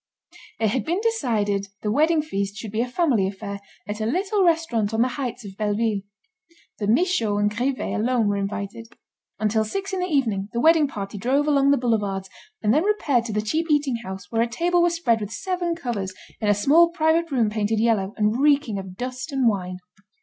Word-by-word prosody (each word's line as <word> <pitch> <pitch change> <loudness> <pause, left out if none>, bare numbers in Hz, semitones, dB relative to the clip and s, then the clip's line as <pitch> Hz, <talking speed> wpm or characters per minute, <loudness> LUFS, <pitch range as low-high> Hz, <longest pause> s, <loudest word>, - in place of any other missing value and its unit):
It 220 -1 +2
had 235 +1 -1
been 345 +4 -1
decided 225 - 0
that 200 0 -27
the 210 - 0
wedding 310 +5 +3
feast 200 -8 -3
should 215 -2 -6
be 220 +2 0
a 245 - -1
family 250 - +1
affair 200 +1 -6 0.3
at 210 +1 -4
a 215 - 0
little 390 - +1
restaurant 255 - +1
on 225 - +4
the 255 - 0
heights 250 -4 -5
of 195 -1 -9
Belleville. 215 0 0 0.8
The 205 - -1
Michauds 230 - +2
and 205 0 +1
Grivet 255 +3 -1
alone 230 0 +1
were 205 - +1
invited. 200 +3 -4 0.5
Until 215 +1 +1
six 390 - -4
in 380 - -1
the 365 - -1
evening, 225 - 0
the 235 - -1
wedding 320 +2 +5
party 200 -5 -6
drove 275 +7 +1
along 280 -2 +4
the 285 - +5
boulevards, 205 -6 -1 0.3
and 210 +1 +3
then 305 +5 +3
repaired 295 - +1
to 230 - -4
the 210 0 0
cheap 320 +10 -1
eating 290 -5 +2
house 190 -5 -8
where 225 - +1
a 235 - +2
table 345 +9 +1
was 345 0 +2
spread 235 -9 +1
with 205 0 -5
seven 355 +4 -2
covers 210 - -4 0.2
in 215 - -2
a 205 - +4
small 310 +11 +5
private 330 0 +1
room 235 -7 +1
painted 215 0 0
yellow, 215 -3 +1
and 215 +3 +1
reeking 285 -8 +3
of 190 -1 -9
dust 255 +3 -5
and 265 -3 +2
wine. 185 -4 -1
230 Hz, 210 wpm, -23 LUFS, 205-300 Hz, 0.8 s, wedding